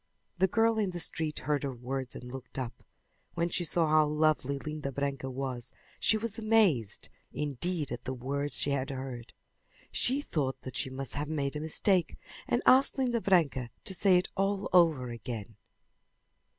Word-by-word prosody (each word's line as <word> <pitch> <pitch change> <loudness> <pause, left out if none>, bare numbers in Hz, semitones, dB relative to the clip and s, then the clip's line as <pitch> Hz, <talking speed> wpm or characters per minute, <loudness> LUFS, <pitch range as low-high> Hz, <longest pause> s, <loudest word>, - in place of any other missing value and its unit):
The 190 - +5
girl 225 +3 +2
in 205 -3 +1
the 175 -1 -5
street 160 -2 -2
heard 145 0 +1
her 135 -3 -3
words 130 +1 -4
and - - -8
looked 125 +1 -9
up. 125 -3 -5 0.5
When 170 0 0
she 175 - 0
saw 165 0 +2
how 155 0 +4
lovely 150 -2 +1
Linda 150 -1 -5
Branca 140 0 -3
was 130 -1 -4 0.2
she 220 - +3
was 225 0 -2
amazed 210 - +2 0.2
indeed 150 +2 -2
at 120 - -5
the 130 - -2
words 140 +3 0
she 145 - +2
had 135 0 -1
heard. 130 -3 -6 0.6
She 260 +3 +2
thought 140 - -2
that 130 - -8
she - - 0
must 130 0 -4
have 145 +1 -3
made 145 -2 -1
a - - -2
mistake 175 +4 +2 0.3
and - - +1
asked 265 +2 +6
Linda 245 -3 +1
Branca 140 - +2 0.2
to 190 - -2
say 190 0 +5
it 180 - 0
all 195 +1 0
over 160 -8 +4
again. 115 -2 -6
150 Hz, 175 wpm, -30 LUFS, 130-180 Hz, 0.6 s, asked